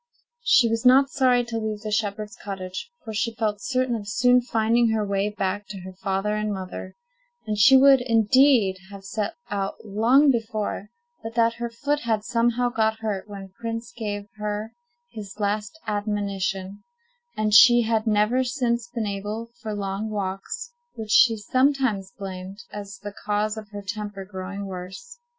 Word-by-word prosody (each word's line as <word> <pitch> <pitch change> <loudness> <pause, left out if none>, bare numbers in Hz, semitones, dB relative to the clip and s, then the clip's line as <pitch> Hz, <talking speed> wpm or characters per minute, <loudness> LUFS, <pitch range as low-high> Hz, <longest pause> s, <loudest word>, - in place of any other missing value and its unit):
She 265 - +5
was 225 +1 -1
not 265 +2 +6
sorry 255 -3 +3
to 230 -1 -3
leave 215 -1 -3
the 215 -1 -5
shepherd's 210 +1 -2
cottage, 190 - -6
for 220 - -6
she 225 +2 -1
felt 215 -3 -1
certain 255 0 0
of 205 -3 -6
soon 250 +4 +4
finding 230 0 +2
her 220 -1 0
way 200 0 0
back 205 0 -3
to 200 -3 -8
her 185 +1 -9
father 195 +2 -1
and 210 0 -1
mother; 185 -1 -6 0.5
and 215 - -1
she 265 +6 +7
would, 270 -1 +7
indeed, 230 -3 +4
have 200 -1 -10
set 210 +1 -3 0.2
out 195 -1 -2
long 240 +8 +4
before, 215 -3 -3 0.3
but 225 0 -7
that 230 -1 +3
her 235 0 -4
foot 285 +5 -1
had 225 -5 -1
somehow 240 +1 +1
got 220 -1 0
hurt 210 -2 -3
when 195 -1 -8
Prince 230 0 -4
gave 205 -3 -4
her 210 +1 -4 0.4
his 205 -1 -9
last 210 +8 -2
admonition, 200 -2 -2 0.6
and 215 -1 0
she 240 +3 +8
had 225 0 0
never 215 +4 +3
since 240 -2 -1
been 235 -2 -3
able 210 +3 -4
for 220 - -4
long 200 +1 -3
walks, 205 - -4 0.2
which 220 -2 -6
she 225 -1 +6
sometimes 255 -4 +1
blamed 195 +2 -7
as 200 -1 -7
the 205 0 -8
cause 210 +1 0
of 215 -2 -9
her 205 -1 -8
temper 205 -1 -5
growing 195 +1 -6
worse. 195 - -8
215 Hz, 165 wpm, -24 LUFS, 200-235 Hz, 0.6 s, she